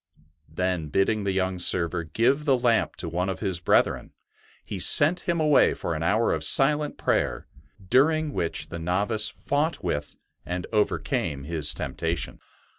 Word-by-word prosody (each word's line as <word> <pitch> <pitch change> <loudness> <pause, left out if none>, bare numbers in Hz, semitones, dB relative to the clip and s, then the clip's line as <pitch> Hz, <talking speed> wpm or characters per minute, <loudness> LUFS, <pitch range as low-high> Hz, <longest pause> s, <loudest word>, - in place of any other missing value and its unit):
Then 90 0 -2
bidding 100 +5 0
the 100 - 0
young 95 -1 -1
server 85 -1 +2
give 125 - 0
the 135 -3 +3
lamp 120 -2 +1
to 85 - -5
one 90 +3 -2
of 95 - -4
his 95 -5 -2
brethren, 90 - +1 0.5
he 100 - -6
sent 165 - +4
him 170 -1 +1
away 150 -2 +3
for 85 - -4
an 80 - -4
hour 105 +7 +1
of - - -3
silent 150 +2 +3
prayer, - - -1 0.4
during 150 - +2
which 85 - -2
the 85 - -6
novice 100 +6 0
fought 150 +4 -2
with 75 0 -3 0.3
and 90 +2 -4
overcame 75 -8 -1
his 80 0 -1
temptation. 80 -3 -4
95 Hz, 155 wpm, -25 LUFS, 85-135 Hz, 0.5 s, sent